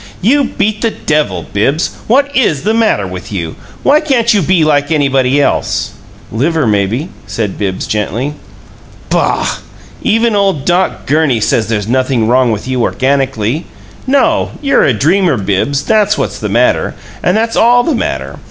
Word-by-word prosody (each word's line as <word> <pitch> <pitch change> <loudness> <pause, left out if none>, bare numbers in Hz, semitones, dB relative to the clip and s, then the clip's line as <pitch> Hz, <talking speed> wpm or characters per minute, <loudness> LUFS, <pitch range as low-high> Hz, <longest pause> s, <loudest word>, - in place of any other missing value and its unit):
"You 275 +8 +2
beat 210 -2 -2
the 230 - +2
devil! 150 - -1
Bibbs, 135 - 0
what 280 +4 +2
IS 160 - +1
the 215 - +1
matter 220 - +1
with 90 +1 -8
you? 85 -5 -4 0.3
Why 295 +2 +4
can't 245 -7 +2
you 205 - +2
be 170 0 +2
like 145 -1 +2
anybody 135 -3 +2
else?" 145 - 0 0.4
"Liver, 150 +6 0
maybe," 110 - 0 0.2
said 105 -4 -3
Bibbs, 95 -2 -2
gently. 115 +7 -2 0.8
"Boh! - - 0 0.4
Even 225 0 +1
ole 200 -1 +2
Doc 175 +5 -1
Gurney 145 -4 +2
says 110 0 +1
there's 105 -2 -2
nothin' 130 -2 +1
wrong 125 0 +3
with 105 +2 -4
you 130 -1 -1
organically. 135 +1 0 0.4
No. 280 +4 +2
You're 275 -2 +2
a 135 - +3
dreamer, 165 - +2
Bibbs; 105 +8 -1
that's 210 -1 +2
what's - - -3
the - - -3
matter, - - +1 0.3
and 180 +4 +1
that's 225 +1 0
ALL 245 +1 +4
the 320 - 0
matter. 65 - -3
145 Hz, 160 wpm, -13 LUFS, -, 0.8 s, Why